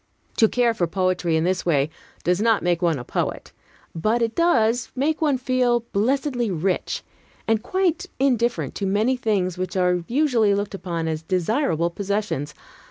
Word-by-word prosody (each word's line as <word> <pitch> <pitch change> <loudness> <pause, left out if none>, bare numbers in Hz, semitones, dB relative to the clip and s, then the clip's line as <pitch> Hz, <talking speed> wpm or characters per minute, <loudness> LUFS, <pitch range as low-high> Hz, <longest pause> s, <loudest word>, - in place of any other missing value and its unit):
To 220 - +6
care 240 -2 +2
for 175 -6 0
poetry 185 -1 0
in 160 - +2
this 185 +1 0
way 150 -3 +1 0.3
does 180 +3 +1
not 225 -1 +3
make 175 -1 +1
one 170 -4 +2
a 125 - -6
poet, - - -3 0.4
but 215 +8 +1
it 225 0 -1
does 245 -9 +2
make 300 +5 0
one 295 -4 +2
feel 250 -2 +1
blessedly 245 +2 0
rich, 185 +1 -1 0.4
and 225 -1 +2
quite 360 - 0
indifferent 245 -3 +1
to 200 - -2
many 215 +7 +2
things 195 -7 -1
which 185 +1 -3
are 180 -1 +2
usually 240 -7 +2
looked 205 0 -3
upon 170 -4 -3
as 155 -1 -2
desirable 175 - 0
possessions. 200 -6 -3
205 Hz, 165 wpm, -23 LUFS, 180-245 Hz, 0.4 s, To